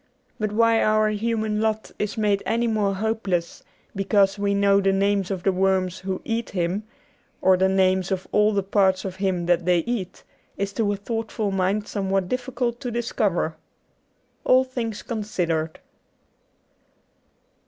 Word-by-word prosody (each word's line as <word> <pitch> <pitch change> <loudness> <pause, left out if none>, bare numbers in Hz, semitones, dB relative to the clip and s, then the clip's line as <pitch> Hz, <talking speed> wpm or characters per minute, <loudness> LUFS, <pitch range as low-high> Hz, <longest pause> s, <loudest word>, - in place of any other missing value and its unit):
But 215 -1 -1
why 230 +1 +3
our 215 0 +3
human 215 0 -1
lot 220 -1 -1
is 210 +1 -2
made 205 -2 +1
any 235 +1 0
more 210 -3 +1
hopeless 200 -5 -2 0.3
because 195 0 +2
we 200 0 +1
know 200 0 +4
the 195 0 +3
names 195 0 +1
of 190 -3 -3
the 195 - +3
worms 185 -1 +1
who 190 -1 -4
eat 230 0 -2
him, 185 +3 -2 0.5
or 190 0 +5
the 190 +1 +2
names 190 -1 +2
of 190 -1 -2
all 210 +1 +4
the 200 -2 0
parts 190 -1 +2
of 190 -1 -5
him 190 -3 -1
that 175 0 +2
they 180 -1 +3
eat, 215 -3 -4 0.3
is 200 0 -2
to 210 -2 0
a - - 0
thoughtful 220 -1 -3
mind 195 +2 0
somewhat 195 -2 -1
difficult 245 -1 -2
to 255 - -4
discover. 220 -8 -1 0.9
''All 255 +1 +5
Things 235 -4 -4
Considered. 175 -8 -2
200 Hz, 155 wpm, -24 LUFS, 190-220 Hz, 0.9 s, or